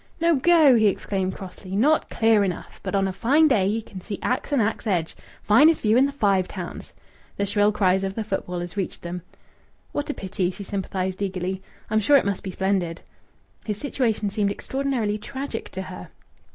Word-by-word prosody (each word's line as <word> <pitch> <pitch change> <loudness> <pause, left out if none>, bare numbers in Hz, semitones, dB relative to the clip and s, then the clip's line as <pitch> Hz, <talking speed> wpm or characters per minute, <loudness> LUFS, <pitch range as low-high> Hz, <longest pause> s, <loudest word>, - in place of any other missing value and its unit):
"No 335 0 +4
go!" 305 -2 +6
he 220 -2 +4
exclaimed 190 -1 -1
crossly. 190 0 -8
"Not 295 +9 +3
clear 225 -2 +3
enough! 180 -4 -4
But - - -3
on 195 0 +2
a 190 - -3
fine 285 +11 +4
day 210 -9 +3
ye 220 +2 -1
can 190 -3 -10
see 200 +1 -5
Axe 250 +4 -1
and 285 - +3
Axe 220 +1 -1
Edge.... 175 -5 0 0.3
Finest 295 +10 +5
view 215 0 +3
in 260 +3 +5
the - - -4
Five 200 -9 +2
Towns." 180 -3 -7 0.5
The 200 - +1
shrill 205 +1 +2
cries 190 -2 +2
of 195 0 -3
the 225 - -2
footballers 180 -3 -4
reached 195 -3 -4
them. 175 +1 -5 0.7
"What 290 - -3
a 295 - -2
pity!" 185 -2 -2
she 195 +2 -7
sympathized 190 -1 -3
eagerly. 190 -1 -2 0.3
"I'm 215 - +3
sure 280 +7 +5
it - - +1
must 200 -2 -1
be 190 - -6
splendid." 185 -3 -1 0.6
His 210 -2 -3
situation 225 -6 -1
seemed 205 -1 +1
extraordinarily 245 -3 -2
tragic 265 +1 -5
to 190 - -5
her. 90 - -9
205 Hz, 190 wpm, -24 LUFS, 190-235 Hz, 0.7 s, go